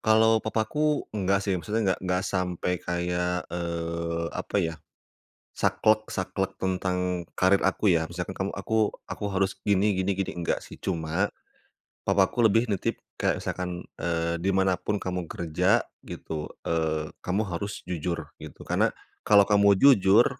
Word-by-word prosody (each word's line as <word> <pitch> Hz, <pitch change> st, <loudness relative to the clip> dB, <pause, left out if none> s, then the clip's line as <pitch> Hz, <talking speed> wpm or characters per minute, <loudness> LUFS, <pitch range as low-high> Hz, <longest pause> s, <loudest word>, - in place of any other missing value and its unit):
Kalau 110 Hz, +1 st, +5 dB
papaku 145 Hz, +8 st, 0 dB
enggak 100 Hz, -1 st, +1 dB
sih, 95 Hz, -2 st, 0 dB
maksudnya 105 Hz, +3 st, 0 dB
enggak -, -, -6 dB
enggak 90 Hz, 0 st, 0 dB
sampai 90 Hz, -1 st, -1 dB
kayak, 90 Hz, 0 st, -1 dB
eee, 85 Hz, -1 st, -2 dB
apa -, -, -3 dB
ya, 80 Hz, -1 st, -1 dB, 0.8 s
saklek 110 Hz, 0 st, +2 dB
saklek 95 Hz, +1 st, -2 dB
tentang 90 Hz, -1 st, -1 dB
karir 95 Hz, +1 st, +4 dB
aku 95 Hz, +2 st, +2 dB
ya. 80 Hz, -2 st, +3 dB
Misalkan 90 Hz, +2 st, -5 dB
kamu 95 Hz, +1 st, -2 dB
aku 110 Hz, +2 st, 0 dB, 0.2 s
aku 105 Hz, -, -4 dB
harus 95 Hz, 0 st, 0 dB
gini 100 Hz, 0 st, +3 dB
gini 95 Hz, +1 st, +1 dB
gini, 95 Hz, 0 st, -2 dB
enggak 85 Hz, -, -1 dB
sih. -, -, -11 dB
Cuma 85 Hz, +2 st, -1 dB, 0.8 s
papa 95 Hz, -1 st, +4 dB
aku 120 Hz, -, -1 dB
lebih 115 Hz, +3 st, +4 dB
nitip 100 Hz, -4 st, -1 dB, 0.2 s
kayak -, -, +1 dB
misalkan, 90 Hz, -1 st, -4 dB
eee, 85 Hz, 0 st, -1 dB
"Di 95 Hz, -, +2 dB
mana 95 Hz, -1 st, +3 dB
pun 105 Hz, +3 st, -2 dB
kamu 90 Hz, -3 st, -4 dB
kerja," 80 Hz, -3 st, +1 dB, 0.2 s
gitu, 75 Hz, -1 st, -6 dB, 0.2 s
eee, 80 Hz, -2 st, -1 dB
"kamu 95 Hz, +4 st, 0 dB
harus 100 Hz, +2 st, -4 dB
jujur," 85 Hz, -1 st, -3 dB, 0.2 s
gitu. -, -, -10 dB
"Karena -, -, +2 dB, 0.3 s
kalau 100 Hz, -2 st, +6 dB
kamu 100 Hz, -1 st, +5 dB
jujur" 115 Hz, -4 st, +6 dB
95 Hz, 150 wpm, -27 LUFS, 85-100 Hz, 0.8 s, kalau